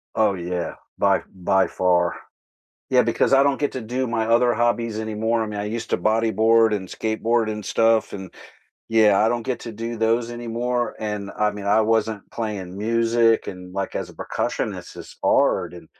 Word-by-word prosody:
Oh, 110 -3 +3
yeah. 90 -1 -3 0.2
By - - +3
by 95 +1 +2
far. 90 -1 +1 0.7
Yeah, 125 -1 +4
because 115 +3 +1
I 135 +1 +6
don't 140 -1 +1
get 145 - 0
to 130 - -4
do 125 +4 -2
my 115 -1 -1
other 120 +1 +4
hobbies 115 -1 0
anymore. 110 +1 -1
I - - -2
mean, 105 -1 -5
I 105 - -3
used 110 +2 -4
to - - +2
bodyboard 110 +2 +3
and 95 -3 -6
skateboard 110 +1 0
and 105 -1 -4
stuff, 115 -1 +2
and, 95 -3 -8 0.6
yeah, 110 -3 +4
I 110 - +4
don't 120 0 -1
get 125 +2 -3
to 115 - -7
do 115 +2 -5
those 115 +1 +1
anymore, 120 +1 -2
and, 105 -2 -4
I 105 0 +2
mean, 100 -1 -7
I 105 +2 +4
wasn't 110 -2 0
playing 100 -5 -5
music 115 +1 +2
and, 90 -1 -8
like, 100 0 -3
as - - -3
a - - -14
percussionist, - - -4
it's - - -11
hard, 90 0 +2
and, 85 -2 -12
110 Hz, 190 wpm, -23 LUFS, 105-115 Hz, 0.7 s, I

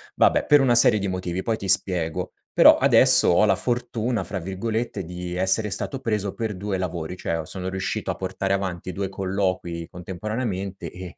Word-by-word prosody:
vabbè - - +2
per 145 -1 +5
una 125 -3 +2
serie 115 -2 +8
di 100 - -3
motivi, 90 -1 -4
poi 110 +2 -2
ti 100 - -7
spiego. 90 -4 +1 0.2
Però - - +6
adesso - - +6
ho - - +4
la - - +2
fortuna, 120 -1 -2
fra 100 - -4
virgolette, 100 +3 -4
di 90 +1 -7
essere 95 +4 +1
stato 115 +7 -4
preso 105 -5 -2
per 110 -3 -4
2 100 0 -3
lavori, 85 -2 -5
cioè 85 -2 -4
o 80 - -6
sono 95 +2 -5 0.4
a - - -3
portare 95 +1 -4
avanti 95 -2 -4
2 95 +2 -4
colloqui 95 -3 -3
contemporaneamente 95 +2 -6
e 90 -1 -10
95 Hz, 175 wpm, -23 LUFS, 90-110 Hz, 0.4 s, serie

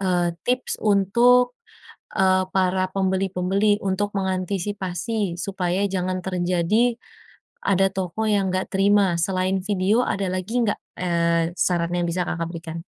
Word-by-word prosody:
eee, 175 -3 +1 0.2
tips 255 +1 -1
untuk, 235 +5 +4 0.6
eee, 185 0 +3
para 185 0 +2
pembeli-pembeli, 195 +1 +1
untuk 200 +1 -1
mengantisipasi 190 0 -2
supaya 185 -1 -1
jangan 185 -1 -2
terjadi 185 +6 +1 0.7
ada 195 0 +3
toko 190 +3 -2
yang 195 -3 +1
enggak 185 - -2
terima, 195 -2 +3
selain 185 +2 0
video, 205 +4 +2
ada 195 -1 -1
lagi 185 +7 -1
enggak, 215 -3 0 0.2
eee, 170 -1 +1
saran 170 -2 +1
yang 175 - 0
bisa 175 +1 -1
Kakak 170 -1 -2
berikan? 165 -1 -7
190 Hz, 125 wpm, -23 LUFS, 180-200 Hz, 0.7 s, untuk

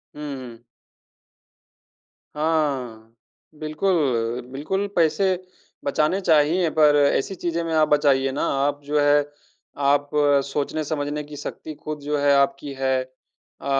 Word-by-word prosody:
हुँ, 150 - -8
हुँ। 120 -2 -11 1.7
हाँ। 140 -8 -1 0.5
बिल्कुल, 150 -8 0
बिल्कुल 190 +9 -2
पैसे 170 +4 +2 0.6
बचाने 150 +6 +1
चाहिए 165 +1 +3
पर 150 -1 +6 0.2
ऐसी 195 +8 -1
चीज़े 170 -1 -2
में 165 -1 -3
आप 155 -1 +4
बचाइए 135 -2 +3
ना। 140 - -3 0.2
आप 145 0 -1
जो 150 +1 0
है 145 0 +4 0.7
आप 145 0 +1 0.4
सोचने-समझने 145 +1 -2
की 150 0 -11
शक्ति 155 - -7
ख़ुद 155 0 -5
जो 145 +1 -1
है 145 0 +3
आपकी 140 +1 0
है 130 -1 0 0.6
अ, - - -10
145 Hz, 120 wpm, -23 LUFS, 140-155 Hz, 1.7 s, पर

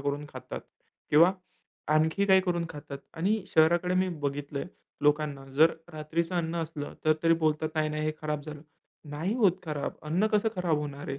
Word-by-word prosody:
करून 145 +1 -2
खातात - - -7 0.5
किंवा 170 +5 +7 0.6
आणखी 160 +6 +2
काही 190 -1 +6
करून 175 -2 0
खातात 145 -2 -8 0.2
आणि 195 +5 0
शहराकडे 175 +3 +3
मी 185 0 +2
बघितलंय 140 0 -3 0.4
लोकांना 150 -2 +1
जर 160 +2 +6 0.2
रात्रीचं 165 +3 -2
अन्न 170 -1 -1
असलं 155 -2 -6
तर 155 - +5
तरी 165 0 +5
बोलतात, 155 -1 0
"नाही, 155 -1 +1
नाही, 155 0 -2
हे 155 - 0
खराब 150 -1 -2
झालं." 150 -1 -8 0.5
नाही 165 +9 -2
होत 205 -7 +5
खराब 150 -3 -3
अन्न. 165 +7 +1
कसं 210 +1 +3
खराब 175 -4 +1
होणार 145 -1 -6
आहे? 135 0 -3
155 Hz, 170 wpm, -29 LUFS, 150-175 Hz, 0.6 s, किंवा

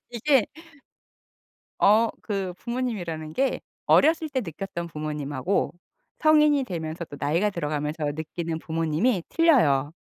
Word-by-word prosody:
이게 245 +1 +2 1.3
어. 220 +3 +5
그 195 -4 -3
부모님이라는 185 -11 -4
게 270 +6 0 0.3
어렸을 315 +1 +4
때 260 -2 -1
느꼈던 170 -1 -5
부모님하고 150 +2 -2 0.5
성인이 300 -3 +5
되면서 170 -5 -5
또 145 - -10
나이가 170 +8 +1
들어가면서 150 -3 -3
느끼는 160 +1 -4
부모님이 165 +6 0
틀려요. 160 - +3
175 Hz, 285 characters per minute, -25 LUFS, 155-245 Hz, 1.3 s, 어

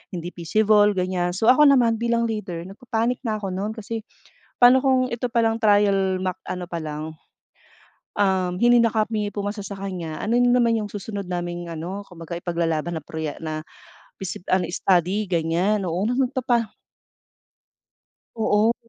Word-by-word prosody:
hindi 175 0 -5
feasible, 210 +4 +3
ganyan. 180 -1 -1
So, 225 +5 +5
ako 295 +3 +6
naman 240 -5 +4
bilang 235 0 +1
leader, 210 -7 -3
nagpa-panic 230 +5 -2
na 215 - 0
ako 200 -3 -4
nun 200 +4 -3
kasi 225 0 -5 0.6
paano 245 +1 +8
kung 260 -1 +2
ito 235 0 -3
palang 230 -2 +1
trial 200 -3 +3
mock 185 -2 -2
ano 180 0 -4
palang, 155 -3 -4 1.1
um, 190 -3 +1
hindi 240 +1 +5
na 230 -1 +3
kami 215 -1 -1
pumasa 205 +1 -3
sa 200 - -6
kanya, 180 -5 -5
ano 225 +3 +1
na 245 0 +4
naman 230 -2 +3
yung 210 - -3
susunod 200 -1 -5
naming 175 -1 -4
ano, 175 +5 -5
kumbaga 170 -1 -7
ipaglalaban 170 -1 -1
na - - -19
proye 160 -1 -5
na 155 -1 -4 0.6
feasi 185 -2 -6
ano, 185 -1 +2
study 185 +3 +1
ganyan, 180 +4 +1
oo, 175 +4 -1
nagpapa 245 -2 0 1.7
Oo. 220 +1 +2
200 Hz, 150 wpm, -23 LUFS, 175-230 Hz, 1.7 s, paano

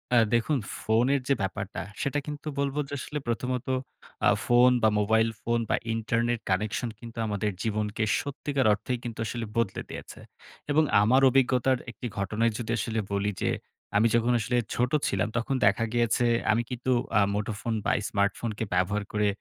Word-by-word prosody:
আ - - +6 0.2
দেখুন 125 +5 +2 0.2
ফোনের 125 +5 +2
যে 140 - +4
ব্যাপারটা 100 +1 -3 0.2
সেটা 145 +1 0
কিন্তু 150 +1 -6
বলবো 140 +1 0
যে, - - -7
"আসলে 150 +2 -4
প্রথমত 125 +2 -2 0.6
আ - - +7 0.2
ফোন 120 +1 +6
বা, 110 - +6
মোবাইল 110 +2 +3
ফোন 120 +1 0
বা, - - +3 0.2
ইন্টারনেট 115 +1 0
কানেকশন 105 +5 0
কিন্তু 115 -1 -11
আমাদের 105 0 -1
জীবনকে 110 0 -1 0.2
সত্যিকার 140 -1 -2
অর্থেই 125 +4 -2
কিন্তু 115 -2 -6
আসলে 115 0 -3
বদলে 115 -5 0
দিয়েছে।" - - -8 0.5
এবং 155 +2 +4 0.2
আমার 130 +6 +4
অভিজ্ঞতার 130 0 +3
একটি 120 - -6
ঘটনায় 110 +4 +1
যদি 115 -1 -4
আসলে 115 -1 -1
বলি 100 +1 0
যে, - - +1 0.5
"আমি 115 +2 +5
যখন 120 +1 +3
আসলে 120 +2 0 0.2
ছোটো 125 +5 +1
ছিলাম 100 +1 0
তখন 130 +3 -1
দেখা 100 +3 +3
গিয়েছে 120 0 +2 0.3
আমি 115 +2 +2
কিন্তু 125 +1 -2 0.3
আ - - +5
মুঠোফোন 110 +2 -2
বা - - +3 0.2
স্মার্টফোনকে 105 +2 -1
ব্যবহার 100 +3 +1
করে 105 0 +2
115 Hz, 165 wpm, -27 LUFS, 105-125 Hz, 0.6 s, আ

